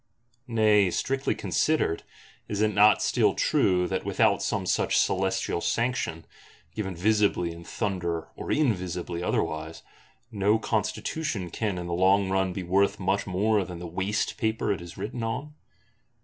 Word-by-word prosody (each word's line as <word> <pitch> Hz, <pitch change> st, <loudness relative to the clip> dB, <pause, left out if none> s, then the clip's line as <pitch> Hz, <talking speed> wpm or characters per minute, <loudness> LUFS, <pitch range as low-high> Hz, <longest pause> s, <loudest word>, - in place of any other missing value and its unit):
Nay, 105 Hz, -4 st, +4 dB
strictly 135 Hz, +8 st, -1 dB
considered, 155 Hz, -, 0 dB, 0.5 s
is 105 Hz, -, -3 dB
it 110 Hz, 0 st, +2 dB
not 105 Hz, +1 st, +5 dB
still -, -, +2 dB
true 90 Hz, -2 st, +2 dB
that 95 Hz, 0 st, -2 dB
without -, -, +2 dB
some -, -, -1 dB
such -, -, +1 dB
celestial 95 Hz, -2 st, 0 dB
sanction, 115 Hz, -10 st, -1 dB, 0.5 s
given 95 Hz, -4 st, -4 dB
visibly 100 Hz, -2 st, +2 dB
in 85 Hz, 0 st, -10 dB
thunder 85 Hz, -4 st, -3 dB
or -, -, -5 dB
invisibly 90 Hz, -, -1 dB
otherwise, 80 Hz, -2 st, -2 dB, 0.5 s
no 105 Hz, 0 st, +2 dB
Constitution 110 Hz, -, -2 dB
can 105 Hz, -2 st, -2 dB
in 90 Hz, -, -4 dB
the 85 Hz, -, -3 dB
long 95 Hz, +2 st, +3 dB
run 95 Hz, -1 st, +1 dB
be 90 Hz, +1 st, -4 dB
worth 95 Hz, +3 st, +2 dB
much 95 Hz, +1 st, 0 dB
more 100 Hz, +3 st, +1 dB
than 90 Hz, -1 st, -8 dB
the 90 Hz, -, -7 dB
waste 95 Hz, +5 st, -2 dB
paper 110 Hz, -2 st, 0 dB
it 95 Hz, -, -6 dB
is 85 Hz, -1 st, -10 dB
written 105 Hz, +5 st, -5 dB
on? 130 Hz, +7 st, -3 dB
95 Hz, 150 wpm, -27 LUFS, 90-110 Hz, 0.5 s, not